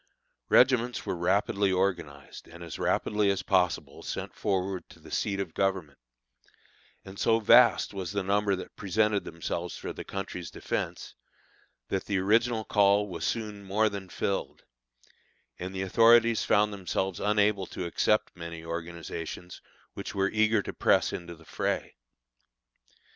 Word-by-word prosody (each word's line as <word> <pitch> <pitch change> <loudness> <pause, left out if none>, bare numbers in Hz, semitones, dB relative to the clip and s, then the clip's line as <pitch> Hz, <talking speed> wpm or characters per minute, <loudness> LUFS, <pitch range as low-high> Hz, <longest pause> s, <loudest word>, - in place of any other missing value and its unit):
Regiments 125 -1 +4
were - - -2
rapidly 95 +2 +1
organized 85 -7 -2
and 85 +1 -11
as 85 - -7
rapidly 105 -1 +1
as 100 - 0
possible 90 -3 0
sent - - -5
forward 95 -2 -2
to - - -16
the - - -14
seat 100 -1 -1
of 90 -5 -4
Government; 95 -7 -1 1.1
and 95 0 -10
so 115 0 +3
vast 120 +1 +5
was 95 -3 -4
the 100 -1 -1
number 100 +1 +1
that 95 - -9
presented 105 +1 +1
themselves 85 +1 -4
for - - -6
their - - -7
country's 95 -3 -6
defence, - - -4 0.8
that 95 - -2
the 100 - 0
original 110 +4 +2
call 105 0 +3
was 85 -3 -6
soon 105 0 -3
more 105 +3 +2
than 100 -2 -7
filled, 100 - -3 1.0
and 90 +1 -5
the 95 0 -3
authorities 115 +3 +5
found 105 0 +2
themselves 95 -1 -2
unable 105 -2 +2
to 90 - -5
accept 105 +5 +1
many 85 -1 -8
organizations 85 +1 -6 0.3
which - - -7
were 100 0 +1
eager 110 -1 +2
to - - -6
press - - +2
into 85 -1 -6
the 80 0 -19
fray. - - -2
95 Hz, 145 wpm, -28 LUFS, 90-105 Hz, 1.1 s, vast